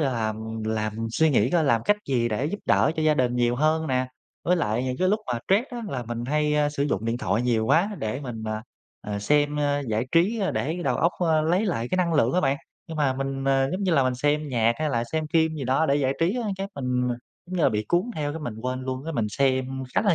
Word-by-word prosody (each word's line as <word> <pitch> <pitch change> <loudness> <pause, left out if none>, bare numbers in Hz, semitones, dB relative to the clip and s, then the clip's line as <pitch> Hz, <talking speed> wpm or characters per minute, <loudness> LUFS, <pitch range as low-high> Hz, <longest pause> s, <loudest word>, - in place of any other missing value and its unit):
là, 140 -3 +1
làm 110 -2 -1 0.3
làm 110 -1 -1
mình 115 0 -2
suy 160 +3 +3
nghĩ 120 -2 +3
coi 170 -3 +3
làm 115 -5 +2
cách 210 - +3
gì 120 -3 +1
để 110 +5 -1
giúp 205 +6 -3
đỡ - - +3
cho 155 - 0
gia 155 -1 +4
đình 125 -2 +1
nhiều 120 0 +2
hơn 155 +2 +2
nè. 130 -1 0 0.4
Với 180 +1 +3
lại 120 -4 0
những 130 0 -2
cái 185 - +2
lúc 215 +2 +2
mà 120 - -1
stress 200 +6 +4
á, 245 - -5
là 125 -8 -3
mình 120 0 -5
hay 150 +2 +1
sử 140 -1 -2
dụng 115 -7 -1
điện 115 +1 0
thoại 120 -3 0
nhiều 115 -3 +1
quá 180 - +3
để 110 +6 -3
mình, 120 -5 -6
ờ, 110 0 -2 0.4
ờ, 105 -1 -4
xem 145 +6 +2 0.3
giải 110 +3 0
trí 200 +7 +3
để 160 +5 -1
đầu - - +1
óc, 170 +2 +2 0.2
a, 155 -1 +4
lấy 180 +7 +2
lại 120 -10 -1
cái 185 - +1
năng 170 -3 +1
lượng 125 -4 +3
á 180 - +3
bạn. 140 -4 +1 0.3
Nhưng 160 - -7
mà 140 -3 +2
mình, 135 0 -3
ờ, 135 0 +2
giống 190 +2 -2
như 185 -3 +1
là, 140 -4 +4
mình 130 -1 +1
xem 145 +3 0
nhạc 115 -2 +2
hay 155 -1 0
là 115 -2 0
xem 160 -1 0
phim 160 -1 +3
gì 140 -4 -4
đó 135 +6 +2
để 140 - +3
giải 135 -2 +1
trí 180 +9 +2
á, 245 - -1
cái 195 +1 -3
mình, 125 -2 -1 0.4
giống 185 +1 -5
như 165 - +1
là, - - +6
bị 105 0 -1
cuốn 175 - +4
theo, 145 -1 -2
cái 160 - -5
mình 120 -7 -5
quên 130 0 -2
luôn, 130 +2 -4
cái 165 - -4
mình 115 -6 0
xem 130 +3 +1 0.3
khá - - +4
là 200 -5 +3
135 Hz, 270 wpm, -25 LUFS, 120-160 Hz, 0.4 s, là